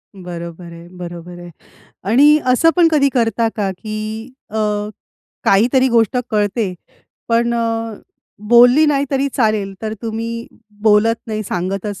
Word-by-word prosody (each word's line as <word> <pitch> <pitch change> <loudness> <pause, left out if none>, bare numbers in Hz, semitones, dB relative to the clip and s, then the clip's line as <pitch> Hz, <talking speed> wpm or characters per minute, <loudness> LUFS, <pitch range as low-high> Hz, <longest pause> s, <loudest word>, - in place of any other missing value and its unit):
बरोबर 170 -1 -8
आहे, 170 0 -12
बरोबर 175 0 -8
आहे 175 0 -10 0.6
आणि 290 +7 +6
असं 310 +6 +4
पण 350 -2 +5
कधी 285 -3 +3
करता 230 -2 +1
का, 200 -3 -1
की 215 +4 -6 0.2
अ, 220 - -5 0.9
काहीतरी 250 +6 +3
गोष्ट 230 -1 +2
कळते 210 -2 0 0.5
पण 235 +1 +1
अ, 225 -1 -2 0.5
बोलली 245 +5 +6
नाही 285 -2 +2
तरी 275 0 0
चालेल 215 -5 0
तर 220 0 -3
तुम्ही 230 +1 -4 0.4
बोलत 220 +1 +4
नाही, 215 -1 -3
सांगतच 195 +1 -4
220 Hz, 130 wpm, -18 LUFS, 195-240 Hz, 0.9 s, आणि